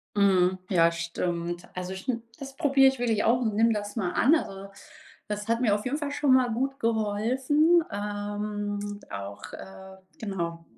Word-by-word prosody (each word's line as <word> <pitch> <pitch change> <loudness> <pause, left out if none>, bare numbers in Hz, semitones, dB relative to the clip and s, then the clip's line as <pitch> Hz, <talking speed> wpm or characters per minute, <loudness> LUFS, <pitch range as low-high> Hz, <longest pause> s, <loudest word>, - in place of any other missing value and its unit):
Mhm, 185 -2 +3
ja, 170 -3 +4
stimmt. 170 +1 -3
Also 180 +1 -4
stim 230 +5 -3 0.2
das 275 -1 -8
probiere 275 -4 +5
ich 265 -1 -1
wirklich 225 -3 +1
auch 240 +2 +3
und 220 -4 0
nimm 225 +2 +4
das 205 +1 -4
mal 185 -5 0
an. 280 +7 +4
Also, 195 -9 -3 0.6
das 210 +1 -4
hat 230 +1 +1
mir 215 -5 +3
auf 210 - -3
jeden 280 +4 0
Fall 290 -2 -3
schon 285 -2 +3
mal 255 -2 +4
gut 270 +4 -2
geholfen. 250 +10 +2
Ähm, 205 0 -4
auch, 100 0 -7
äh, 190 0 -11 0.2
genau 170 -5 -4
210 Hz, 165 wpm, -27 LUFS, 190-250 Hz, 0.6 s, probiere